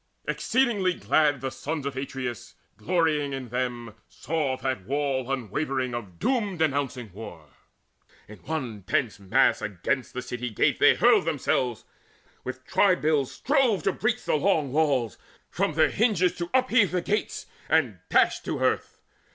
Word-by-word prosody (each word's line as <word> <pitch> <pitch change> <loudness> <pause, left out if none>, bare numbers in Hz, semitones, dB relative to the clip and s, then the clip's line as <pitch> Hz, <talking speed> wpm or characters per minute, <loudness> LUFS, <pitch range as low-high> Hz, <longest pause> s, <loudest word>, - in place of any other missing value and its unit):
Exceeding 240 -6 +1 0.2
glad 145 -4 +2
the 135 -1 -3
sons 150 -1 -4
Of 140 -1 -3
Atreus, 130 -3 -5 0.2
glorying 155 -5 0
in 130 -2 -5
them, 120 -2 -3 0.2
saw 145 -4 -2
that 130 -9 -3
wall 135 -2 -1
Unwavering 130 +1 -2
of 100 -8 -6
doom 210 - 0
denouncing 140 - -1
war. 85 -8 -10 0.8
In 105 0 -12
one 130 -9 -4
dense 115 -6 0
mass 95 -2 +2
against 115 +8 -2
the 125 - -3
city 125 0 -4
gate 110 - +1
They - - +6
hurled - - +4
themselves, 120 -4 -1 0.6
with 130 0 -7
twibills 155 -8 +2
strove 265 -8 +1
to - - +2
breach 240 +3 -1
The - - 0
long 155 -4 +1
walls, 135 -7 +1 0.3
from - - 0
their - - +3
hinges 200 -5 +2
to 170 -1 -4
upheave 255 -6 +3
The 180 -1 -1
gates, 210 +4 -2 0.2
and - - +2
dash - - +3
to - - -4
earth. - - 0
140 Hz, 145 wpm, -26 LUFS, 125-170 Hz, 0.8 s, They